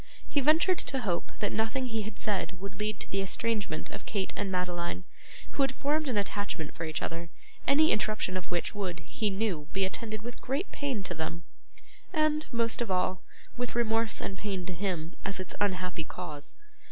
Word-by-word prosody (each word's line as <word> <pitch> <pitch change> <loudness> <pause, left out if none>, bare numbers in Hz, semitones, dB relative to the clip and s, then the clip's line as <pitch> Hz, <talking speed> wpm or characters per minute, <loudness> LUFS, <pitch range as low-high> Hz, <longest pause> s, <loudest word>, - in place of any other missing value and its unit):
He 285 - +3
ventured 320 +6 +5
to 265 - -1
hope 180 -7 0
that 205 - +2
nothing 225 +4 +1
he 225 -3 0
had 210 -1 -5
said 190 -3 0
would 195 +2 -6
lead 210 -1 0
to - - -4
the 195 - +2
estrangement 200 -4 0
of - - -7
Kate 195 -3 0
and 200 -2 -1
Madeline, 180 -1 0 0.5
who - - 0
had 270 -1 +5
formed 295 +2 +1
an 235 - +1
attachment 200 -5 -1
for 165 - -3
each 160 0 -1
other, 165 0 -3 0.4
any 310 +3 +7
interruption 215 -3 +2
of 185 - -3
which 175 -1 0
would, 185 -5 -2
he 210 +7 0
knew, 190 -7 0
be 195 0 +3
attended 215 +2 -3
with 240 +1 -6
great 280 +9 -1
pain 265 -8 -1
to - - -2
them, 165 +1 -3 0.7
and, 310 -2 +3
most 230 -1 +2
of 235 - 0
all, 185 0 +2 0.4
with 245 -1 -2
remorse 225 -2 +3
and 195 - -3
pain 195 -3 -1
to 185 - -2
him, 175 -2 -1
as 195 -1 -1
its 185 - -4
unhappy 185 -4 +1
cause. 155 -3 -5
205 Hz, 190 wpm, -31 LUFS, 180-235 Hz, 0.7 s, any